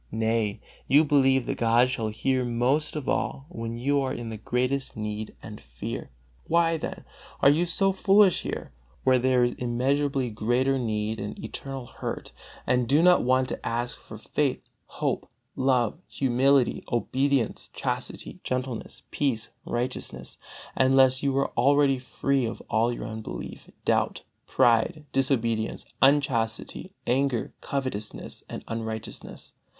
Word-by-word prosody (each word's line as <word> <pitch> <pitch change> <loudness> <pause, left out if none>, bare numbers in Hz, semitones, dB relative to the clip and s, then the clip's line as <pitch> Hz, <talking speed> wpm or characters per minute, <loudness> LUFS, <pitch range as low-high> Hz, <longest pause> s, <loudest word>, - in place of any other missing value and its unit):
Nay, 110 -2 0 0.3
you 150 +3 +6
believe 135 -3 +4
that - - -3
God 120 +2 +4
shall 115 -4 -1
hear 130 +4 0
most 125 +6 +1
of 150 -3 -4
all 135 - -1
when 115 -7 -5
you 140 +4 +1
are 130 -1 -1
in 120 -3 -5
the 110 - -5
greatest 125 +5 -1
need 105 0 -4
and 105 -1 -9
fear. - - -6 0.4
Why, 165 0 +3
then, - - -6 0.4
are 140 - +7
you 170 +4 +2
so 195 +3 +3
foolish 195 0 +4
here, - - -5 0.3
where 130 -1 +4
there 125 0 +3
is 120 - +2
immeasurably 130 +1 0
greater 125 +5 +1
need 110 -2 -2
and 105 +1 -5
eternal 135 +3 -6
hurt, - - -6 0.3
and 125 -1 +2
do 145 +6 +4
not 180 0 +6
want 130 +1 +2
to - - -5
ask 120 +1 -2
for 110 - -11
faith, 135 +4 -1 0.3
hope, - - -2 0.3
love, 130 0 +1
humility, 135 0 +2
obedience, 130 +1 0
chastity, - - -4
gentleness, 130 -2 -4
peace, 120 -6 -1 0.2
righteousness, 125 +2 -2 0.4
unless 130 0 +4
you 140 -1 +1
are 140 - +1
already 140 +1 +3
free 130 +1 0
of 115 - -5
all 115 +2 +3
your 120 - -5
unbelief, 110 0 -7 0.2
doubt, - - +1 0.2
pride, 120 +7 +3
disobedience, 115 -5 0 0.2
unchastity, 135 -5 +1
anger, 130 -1 0
covetousness 130 -7 -4
and - - -6
unrighteousness. 110 -1 -5
125 Hz, 135 wpm, -27 LUFS, 115-140 Hz, 0.4 s, are